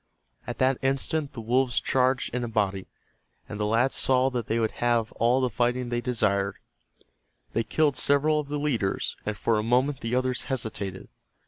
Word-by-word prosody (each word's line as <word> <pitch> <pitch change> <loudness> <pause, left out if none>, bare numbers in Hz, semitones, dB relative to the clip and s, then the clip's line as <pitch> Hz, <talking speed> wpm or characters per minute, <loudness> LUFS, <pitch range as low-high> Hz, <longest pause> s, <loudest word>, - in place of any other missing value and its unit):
At - - -4
that 130 0 +2
instant 135 +3 -1
the 115 - -6
wolves 125 +2 +1
charged 130 -1 +1
in 125 0 -1
a - - -2
body, 100 -4 -1 0.6
and 105 - -7
the 105 - 0
lads 115 +5 +2
saw 130 0 +2
that 120 -3 -3
they 115 - 0
would 110 -1 +1
have 120 -2 +1
all 120 +3 +2
the 130 - +1
fighting 125 +2 0
they 120 0 -1
desired. 100 -5 0 1.0
They 115 - +1
killed 145 +5 +1
several 145 +3 +3
of 150 - -4
the 145 +1 -3
leaders, 120 -10 -1
and 105 -1 -2
for 110 +1 +1
a - - +1
moment 125 +4 +1
the 115 +2 -1
others 130 -1 0
hesitated. 105 -7 -4
120 Hz, 185 wpm, -26 LUFS, 110-130 Hz, 1.0 s, several